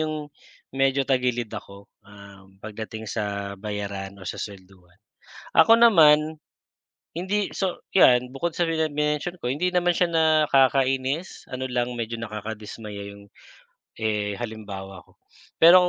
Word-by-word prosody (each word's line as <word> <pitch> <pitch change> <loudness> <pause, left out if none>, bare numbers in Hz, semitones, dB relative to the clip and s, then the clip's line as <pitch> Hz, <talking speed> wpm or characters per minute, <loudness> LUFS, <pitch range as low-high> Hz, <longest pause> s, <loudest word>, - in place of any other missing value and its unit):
yung 155 -1 -3 0.5
medyo 135 0 +3
tagilid 125 -4 0
ako, 100 0 -9 0.2
um, 100 -1 -15
pagdating 110 +1 -7
sa 100 -2 -3
bayaran 100 -2 -5
o 95 - -12
sa - - -8
swelduhan. 95 -3 -11 0.6
Ako 230 - +8
naman, 160 -9 +5 0.8
hindi 190 +4 -1
so, 190 -2 -1 0.2
yan 125 -9 +6
bukod 170 +5 -1
sa 170 +1 0
mini 160 -2 0
minention 150 +4 -1
ko, 120 - -4
hindi 155 +8 0
naman 175 -1 +2
siya 175 0 +2
nakakainis 140 -1 +2
ano 130 0 -5
lang 125 0 -1
medyo 115 -1 -4
nakadismaya 105 -1 -7
yung, 100 0 -13 0.7
eh, 105 -2 -1
halimbawa 100 -5 -7
ko - - -28 0.4
pero 170 +2 +9
125 Hz, 130 wpm, -24 LUFS, 105-155 Hz, 0.8 s, pero